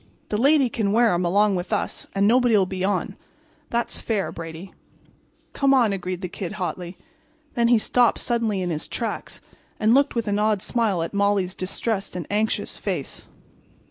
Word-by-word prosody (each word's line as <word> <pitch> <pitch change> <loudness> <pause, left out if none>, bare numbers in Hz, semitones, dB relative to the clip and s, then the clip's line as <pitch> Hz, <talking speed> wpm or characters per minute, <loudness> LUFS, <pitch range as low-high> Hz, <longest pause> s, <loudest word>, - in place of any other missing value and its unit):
The 210 - 0
lady 280 +1 +4
can 215 -4 -1
wear 230 -1 +4
'em 175 +1 0
along 200 +3 +3
with 180 0 -4
us - - -2
and 195 0 +3
nobody'll 230 -4 +4
be 185 0 -4
on. 195 -1 -1 0.5
That's 235 0 -1
fair, 215 -4 -1
Brady." 165 +3 -8 0.8
"Come 275 -1 +3
on," 235 -6 +3
agreed 185 -1 -4
the 180 - -3
Kid, 180 +2 -6
hotly. 180 -2 -4
And 310 +3 -35
then 235 -1 +2
he 240 0 +5
stopped 240 +2 +3
suddenly 225 -5 0
in 175 - -2
his 155 -1 -3
tracks 230 - -4 0.4
and 220 +2 +4
looked 280 +1 +3
with 230 -2 -1
an 205 0 +1
odd 210 -2 +1
smile 215 -8 +1
at 165 - -5
Molly's 200 -2 +1
distressed 195 +2 -3
and 175 -3 -4
anxious 215 +1 -1
face. - - -4
205 Hz, 175 wpm, -23 LUFS, 185-235 Hz, 0.8 s, he